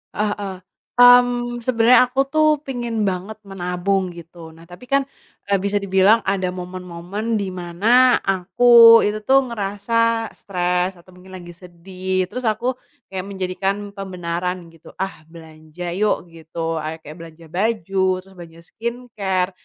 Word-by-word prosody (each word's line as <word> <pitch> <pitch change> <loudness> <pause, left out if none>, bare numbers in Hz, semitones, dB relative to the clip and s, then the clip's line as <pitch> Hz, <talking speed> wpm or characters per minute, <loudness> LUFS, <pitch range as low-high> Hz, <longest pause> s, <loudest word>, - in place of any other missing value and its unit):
Heeh, 205 -3 -3 0.4
mmm, 245 -1 +5
sebenarnya 240 +1 +4
aku 265 - -4
tuh 310 0 +3 0.2
pingin 240 -5 -3
banget 190 +3 -3
menabung 190 0 -2
gitu. 170 -1 -12
Nah, 165 - -16
tapi 180 +8 -14
kan, 275 0 +2 0.5
eee, 200 - +3
bisa 200 +1 -2
dibilang 195 +4 +4
ada 190 -1 0
momen-momen 180 +4 -5
di 195 -2 -3
mana 210 +9 +3
aku 230 +5 +6
itu 210 +1 -1
tuh 270 0 +4
ngerasa 225 +2 -1
stres 180 -1 -2
atau 180 +2 -19
mungkin 185 +1 -13
lagi 175 -1 -11
sedih. 185 +2 -4
Terus 250 -1 -3
aku, 230 +4 0 0.4
kayak 185 -1 -3
menjadikan 190 0 -2 0.2
pembenaran 180 -2 -4 0.2
gitu, 165 - -16
"Ah, 190 -4 -4
belanja 160 +1 -9
yuk," 200 -3 0
gitu, 165 0 -5
ayo 155 +1 -4
kayak 155 0 -11
belanja 165 0 -12
baju, 195 +1 -1 0.2
terus 190 +1 -16
belanja 170 -2 -13
skincare. 215 -6 -3
190 Hz, 135 wpm, -20 LUFS, 180-225 Hz, 0.5 s, aku